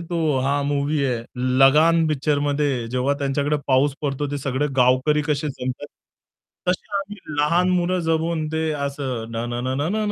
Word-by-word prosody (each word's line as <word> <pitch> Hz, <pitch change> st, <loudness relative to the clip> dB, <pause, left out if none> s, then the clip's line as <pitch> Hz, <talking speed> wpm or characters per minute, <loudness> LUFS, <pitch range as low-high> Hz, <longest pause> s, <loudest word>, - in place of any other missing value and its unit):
तो 165 Hz, -4 st, 0 dB
हा 140 Hz, +2 st, +1 dB
मूव्ही 145 Hz, +1 st, 0 dB
आहे 125 Hz, -4 st, -1 dB, 0.4 s
लगान 160 Hz, +5 st, +5 dB
पिक्चरमध्ये 145 Hz, -3 st, 0 dB
जेव्हा 130 Hz, +3 st, 0 dB
त्यांच्याकडे 140 Hz, +1 st, 0 dB
पाऊस 135 Hz, +1 st, +3 dB
पडतो 145 Hz, 0 st, -2 dB
ते 145 Hz, -, -2 dB
सगळे 135 Hz, +1 st, -1 dB
गावकरी 130 Hz, +4 st, +3 dB
कसे 150 Hz, 0 st, 0 dB
जमतात. 130 Hz, +1 st, -5 dB, 0.8 s
तश्या 200 Hz, +3 st, -1 dB
आम्ही 200 Hz, +1 st, -6 dB, 0.2 s
लहान 170 Hz, +5 st, +3 dB
मुलं 180 Hz, 0 st, +1 dB
जमून 160 Hz, 0 st, 0 dB
ते 160 Hz, 0 st, 0 dB
असं 140 Hz, -5 st, -3 dB
न 115 Hz, +1 st, -3 dB
न 120 Hz, -, -2 dB
न 130 Hz, -, -1 dB
न 150 Hz, -, 0 dB
न 215 Hz, -, 0 dB
145 Hz, 160 wpm, -22 LUFS, 135-160 Hz, 0.8 s, लगान